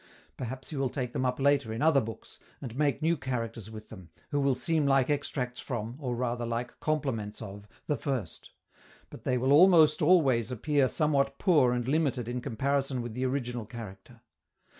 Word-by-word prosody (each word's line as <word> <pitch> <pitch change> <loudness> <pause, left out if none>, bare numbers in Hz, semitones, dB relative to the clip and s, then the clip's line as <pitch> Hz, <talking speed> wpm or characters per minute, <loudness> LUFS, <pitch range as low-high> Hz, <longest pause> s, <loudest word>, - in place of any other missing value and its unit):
Perhaps 130 +3 -6
he 150 - -4
will 135 -1 0
take 125 -2 -4
them 130 - 0
up 125 +1 -2
later 140 -4 +2
in 115 +6 -2
other 155 -4 +5
books, 115 -1 -9 0.2
and 120 -4 -7
make 145 -2 0
new 165 +1 +3
characters 115 - -4
with 110 -1 -10
them, 95 -6 -12 0.2
who 145 - +1
will 140 -2 +2
seem 160 0 0
like 135 0 +3
extracts 130 -3 -2
from, 115 -2 -4
or 125 -5 -3
rather 120 0 -2
like 120 +1 -4
complements 130 -9 -2
of, 105 -1 -9 0.2
the 150 - 0
first; 125 - -4 0.6
but - - -12
they 125 - +1
will 130 +3 +2
almost 160 -2 +6
always 140 - +4
appear 135 +3 +1
somewhat 140 -3 +1
poor 150 -10 +4
and 120 -1 -1
limited 135 -5 0
in 125 +1 -3
comparison 135 +2 -1
with 120 -2 -6
the 130 +2 -1
original 125 -4 -3
character. 115 0 -10
130 Hz, 185 wpm, -29 LUFS, 115-140 Hz, 0.6 s, almost